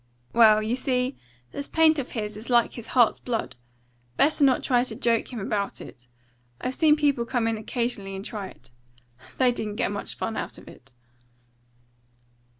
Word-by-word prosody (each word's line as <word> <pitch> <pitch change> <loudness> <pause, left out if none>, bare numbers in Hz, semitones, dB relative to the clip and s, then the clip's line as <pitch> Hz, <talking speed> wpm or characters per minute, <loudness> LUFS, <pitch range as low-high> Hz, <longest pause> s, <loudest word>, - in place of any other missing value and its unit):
Well, 215 -2 +6
you 225 +3 0
see, 255 0 -1 0.4
this 285 - -5
paint 320 -1 +4
of 260 - -5
his 210 -3 -4
is 215 +4 -9
like 240 -1 +3
his 235 -2 -8
heart's 240 -3 +5
blood. 235 -3 -3 0.6
Better 300 +1 +3
not 265 -2 +4
try 245 -2 +3
to 255 - -3
joke 230 0 0
him 240 - -5
about 200 -1 -2
it. 120 0 -12 0.5
I've 255 - -3
seen 305 +1 +4
people 285 -5 +1
come 235 -1 -1
in 225 - 0
occasionally 215 -3 -3
and 190 +1 -7
try 205 -4 -5
it. 120 -8 -17 0.7
They 255 -2 +4
didn't 215 -3 -4
get 215 - -1
much 205 - -5
fun 225 - -3
out - - -5
of - - -15
it." 135 +2 -15
235 Hz, 175 wpm, -25 LUFS, 215-255 Hz, 0.7 s, Well